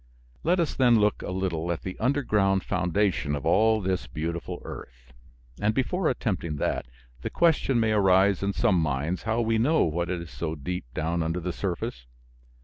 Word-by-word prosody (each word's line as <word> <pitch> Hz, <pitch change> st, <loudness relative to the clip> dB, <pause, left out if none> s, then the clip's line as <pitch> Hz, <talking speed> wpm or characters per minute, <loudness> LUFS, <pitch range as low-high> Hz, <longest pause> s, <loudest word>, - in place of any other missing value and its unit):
Let 175 Hz, +3 st, +2 dB
us 170 Hz, -, 0 dB
then 120 Hz, -3 st, +4 dB
look 105 Hz, 0 st, +2 dB
a -, -, -5 dB
little 90 Hz, -3 st, -2 dB
at 85 Hz, -, -4 dB
the 95 Hz, -, -5 dB
underground 105 Hz, -7 st, +2 dB
foundation 90 Hz, -4 st, 0 dB
of 70 Hz, -, -5 dB
all 110 Hz, +6 st, +4 dB
this 95 Hz, -9 st, -1 dB
beautiful 80 Hz, +6 st, -4 dB
earth. -, -, -10 dB, 0.5 s
And 110 Hz, +1 st, +1 dB
before 160 Hz, +7 st, +1 dB
attempting 95 Hz, -, -2 dB
that, 70 Hz, -, -2 dB, 0.3 s
the -, -, -3 dB
question 155 Hz, -7 st, +2 dB
may 110 Hz, -1 st, +2 dB
arise 95 Hz, -2 st, +4 dB
in 100 Hz, 0 st, 0 dB
some 95 Hz, -2 st, +2 dB
minds 75 Hz, +4 st, -1 dB
how 115 Hz, +2 st, +2 dB
we 115 Hz, -1 st, +1 dB
know 155 Hz, +8 st, +3 dB
what 85 Hz, +2 st, -1 dB
is 85 Hz, -2 st, -4 dB
so 80 Hz, -1 st, -3 dB
deep 90 Hz, +2 st, -4 dB
down 85 Hz, +2 st, -1 dB
under 80 Hz, +2 st, -1 dB
the 90 Hz, 0 st, -3 dB
surface. 85 Hz, -10 st, -4 dB
95 Hz, 175 wpm, -26 LUFS, 80-110 Hz, 0.5 s, then